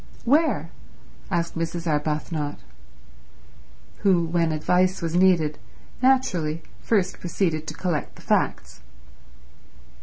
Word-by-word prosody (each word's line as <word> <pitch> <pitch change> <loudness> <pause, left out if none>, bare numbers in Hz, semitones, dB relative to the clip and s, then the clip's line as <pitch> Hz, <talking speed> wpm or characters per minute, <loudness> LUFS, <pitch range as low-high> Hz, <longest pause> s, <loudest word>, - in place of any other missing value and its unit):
"Where?" 305 +6 +2 0.6
asked 170 -2 -1
Mrs. 165 +1 -3
Arbuthnot, 150 0 -1 1.4
who, 185 -4 +3
when 165 0 +1
advice 180 +4 +2
was 165 -1 -3
needed, 170 -5 +3 0.4
naturally 185 -13 +2 0.2
first 195 -5 0
proceeded 165 -3 -1
to 155 - -5
collect 170 -4 -2
the - - -15
facts. - - 0
170 Hz, 95 wpm, -24 LUFS, 155-185 Hz, 1.4 s, who